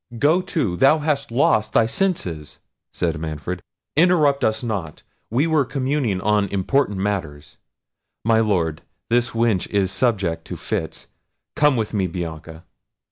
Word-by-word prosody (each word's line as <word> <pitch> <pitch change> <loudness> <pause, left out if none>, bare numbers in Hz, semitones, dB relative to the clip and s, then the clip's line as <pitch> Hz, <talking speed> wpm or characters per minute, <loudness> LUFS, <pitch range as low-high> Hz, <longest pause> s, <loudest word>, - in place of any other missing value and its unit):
"Go 155 +9 +3
to, 155 - -1
thou 135 - +5
hast 150 -2 -1
lost 110 -3 +2
thy 115 - +4
senses," 110 - -2 0.3
said 85 -2 -2
Manfred. 80 +3 -5 0.3
"Interrupt 155 -4 +4
us 110 +1 +1
not; 100 -10 -4 0.3
we 125 +7 +2
were 160 -3 +3
communing 130 -5 -1
on 105 0 +2
important 100 +3 0
matters—My 95 +4 -4
Lord, 85 -8 0 0.3
this 120 +1 +3
wench 115 -5 +1
is 100 -2 +1
subject 100 -10 0
to - - -6
fits—Come 150 -2 -2
with 110 -2 -2
me, 95 -3 +1
Bianca." 80 -2 -6
110 Hz, 130 wpm, -22 LUFS, 90-135 Hz, 0.3 s, thou